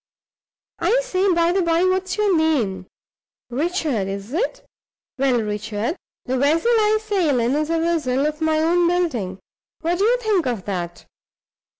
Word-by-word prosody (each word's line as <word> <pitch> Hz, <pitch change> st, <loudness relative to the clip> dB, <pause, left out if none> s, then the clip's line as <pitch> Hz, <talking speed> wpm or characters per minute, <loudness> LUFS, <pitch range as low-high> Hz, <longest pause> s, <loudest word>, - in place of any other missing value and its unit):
I -, -, +2 dB
say, 390 Hz, -5 st, +1 dB
by 340 Hz, 0 st, +3 dB
the 380 Hz, +1 st, +1 dB
by, 335 Hz, 0 st, +2 dB
what's 375 Hz, +1 st, 0 dB
your 415 Hz, -3 st, +2 dB
name? 235 Hz, -, 0 dB, 0.6 s
Richard, 290 Hz, -, -1 dB
is 200 Hz, +5 st, -6 dB
it? 410 Hz, +10 st, -2 dB, 0.5 s
Well, 260 Hz, -3 st, +2 dB
Richard, 210 Hz, +5 st, -3 dB, 0.3 s
the 260 Hz, 0 st, -1 dB
vessel 320 Hz, -, +2 dB
I 435 Hz, -2 st, +3 dB
sail 380 Hz, -, +1 dB
in 235 Hz, +2 st, +1 dB
is 305 Hz, +1 st, 0 dB
a 330 Hz, -, +1 dB
vessel 305 Hz, -5 st, 0 dB
of 305 Hz, +1 st, -3 dB
my 315 Hz, 0 st, +2 dB
own 340 Hz, +2 st, +3 dB
building! 280 Hz, -, -1 dB, 0.4 s
What 345 Hz, +2 st, 0 dB
do -, -, +2 dB
you 485 Hz, +3 st, +3 dB
think 425 Hz, -, 0 dB
of 235 Hz, -6 st, -3 dB
that? 175 Hz, -3 st, -5 dB
320 Hz, 160 wpm, -21 LUFS, 245-365 Hz, 0.6 s, by